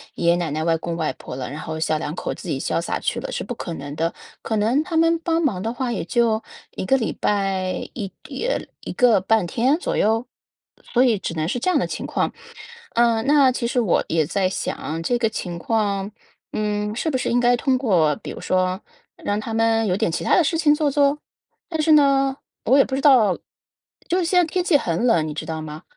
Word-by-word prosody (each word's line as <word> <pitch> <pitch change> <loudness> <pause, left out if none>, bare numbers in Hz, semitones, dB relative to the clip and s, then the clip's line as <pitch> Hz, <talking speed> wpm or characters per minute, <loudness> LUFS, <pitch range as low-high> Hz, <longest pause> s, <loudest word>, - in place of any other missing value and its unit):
爷 170 - -1
爷 - - +3
奶 170 -3 -2
奶、 155 +2 -2
外 165 - +3
公 170 +1 -4
外 155 -5 -1
婆 125 - -9
了， 130 - -4
然 150 +2 -7
后 160 0 -5
小 155 -1 +1
两 150 -1 -4
口 - - -3
自 - - -9
己 - - -1
潇 - - -1
洒 - - -2
去 - - -2
了， - - -5
是 - - -3
不 245 - -5
可 170 -6 -5
能 145 +1 -7
的， 165 +1 -1 0.3
可 220 - -2
能 235 +8 +2
他 330 -1 -2
们 330 +1 +4
帮 330 0 0
忙 205 - 0
的 225 +2 -2
话， 250 0 -2
也 195 - -2
就 225 +4 +1 0.3
1 - - -3
个 270 +7 +3
礼 225 - -2
拜 195 -2 -1
1 200 -5 -5 0.4
呃， - - 0 0.2
1 - - -6
个 240 -6 +4
半 210 -1 +2
天 255 - +1
左 - - -2
右？ 225 +3 +1 0.6
所 245 - +1
以 230 -4 +3
只 185 - -4
能 155 -1 -2
是 240 +7 -1
这 370 - 0
样 - - +3
的 - - -1
情 - - -5
况。 - - -1 0.6
嗯， 230 0 +2
那 280 -2 +5
其 245 -1 -3
实 245 +1 0
我 205 -7 +2
也 160 -1 +2
在 190 +4 0
想， 165 -3 -4
这 240 +9 0
个 230 -2 +1
情 175 -5 -5
况， 200 -1 -1 0.4
嗯， 210 0 -2
是 320 - -1
不 265 - 0
是 255 - -2
应 245 - +2
该 245 0 +4
通 260 0 +1
过， 175 - +2
比 - - -9
如 - - -8
说 185 +1 0 0.3
让 205 +1 -2
他 225 +1 -5
们 225 0 +2
有 180 - +1
点 220 -5 0
其 - - -3
他 - - +3
的 355 - +5
事 325 +2 0
情 300 -2 +4
做 295 -1 +1
做？ 285 +1 +3 0.5
但 320 -3 -1
是 315 0 +4
呢， 275 -2 +4 0.3
我 260 +5 +5
也 275 - +7
不 - - -7
知 270 - 0
道， 240 -10 +5 0.7
就 360 - +2
是 355 - 0
现 360 +2 +3
在 355 - +4
天 360 +3 -1
气 345 -4 +4
很 170 -3 -1
冷， 165 -10 +3
你 150 - -4
知 150 - -5
道 160 -1 -4
吗？ 155 0 -8
225 Hz, 250 characters per minute, -22 LUFS, 180-270 Hz, 0.7 s, 也